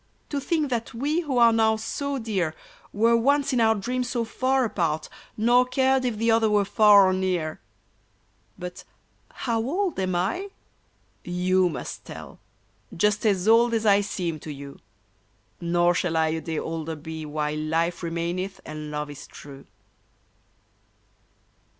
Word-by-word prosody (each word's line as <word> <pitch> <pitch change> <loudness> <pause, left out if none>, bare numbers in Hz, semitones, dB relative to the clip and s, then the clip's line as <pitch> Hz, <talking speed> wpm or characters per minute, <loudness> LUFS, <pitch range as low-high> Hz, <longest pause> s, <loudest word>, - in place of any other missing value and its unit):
To 285 - -2
think 300 -1 -1
that 230 -1 -3
we 290 +7 0
who 295 -7 -2
are 235 -1 +6
now 220 -1 +3
so 275 +6 -3
dear 195 -9 -2 0.4
Were 230 +3 +3
once 280 +4 +2
in 245 - +2
our 220 0 +4
dreams 245 +4 -2
so 240 -2 -1
far 260 +3 +1
apart, 160 -7 -1 0.3
Nor 240 +3 +4
cared 265 0 +2
if 240 -4 -1
the 230 +1 +2
other 225 -1 +3
were 205 -1 +3
far 205 -1 +6
or 185 - +2
near! 180 -4 -1 1.0
But 180 0 -7 0.3
— - - -32
how 230 -3 +1
old 335 - -1
am 185 -1 -1
I? 215 - -1 0.7
You 180 +1 +1
must - - -6
tell. - - -10 0.6
Just 210 +4 +2
as 195 -1 +1
old 230 +1 +5
as 225 0 -1
I 200 -1 +5
seem 175 -5 -3
to 155 - -8
you! 140 -1 -9 0.8
Nor 175 0 +2
shall 170 -2 -1
I 160 0 +2
a 160 +1 -2
day 160 -1 -4
older 160 0 -4
be 160 +1 -7
While 150 0 -2
life 165 +3 -1
remaineth 175 +3 -3
and 155 0 -7
love 150 0 -4
is 145 - -10
true 140 -1 -12
200 Hz, 155 wpm, -25 LUFS, 165-235 Hz, 1.0 s, are